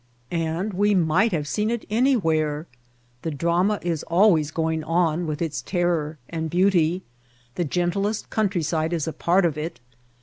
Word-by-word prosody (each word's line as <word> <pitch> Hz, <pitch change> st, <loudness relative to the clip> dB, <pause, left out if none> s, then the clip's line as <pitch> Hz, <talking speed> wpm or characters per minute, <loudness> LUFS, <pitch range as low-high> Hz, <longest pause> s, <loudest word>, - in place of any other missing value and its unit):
And 170 Hz, +4 st, -1 dB
we 205 Hz, +2 st, +2 dB
might 180 Hz, +6 st, +3 dB
have 150 Hz, -5 st, -1 dB
seen 210 Hz, +10 st, 0 dB
it 235 Hz, -1 st, -2 dB
anywhere! 165 Hz, -, +1 dB, 0.6 s
The 165 Hz, -, -3 dB
drama 170 Hz, +7 st, +1 dB
is 170 Hz, -3 st, -1 dB
always 170 Hz, -4 st, +3 dB
going 160 Hz, 0 st, -1 dB
on 165 Hz, 0 st, +1 dB
with 155 Hz, +2 st, -2 dB
its 160 Hz, -3 st, -3 dB
terror 170 Hz, -4 st, -1 dB
and 160 Hz, -1 st, -3 dB
beauty. 180 Hz, 0 st, +2 dB, 0.5 s
The 175 Hz, +6 st, -1 dB
gentlest 185 Hz, +6 st, -1 dB
countryside 170 Hz, -6 st, 0 dB
is 165 Hz, -2 st, -1 dB
a 160 Hz, -, -2 dB
part 180 Hz, +2 st, +2 dB
of 155 Hz, -3 st, 0 dB
it. 165 Hz, +2 st, -5 dB
170 Hz, 155 wpm, -24 LUFS, 160-190 Hz, 0.6 s, might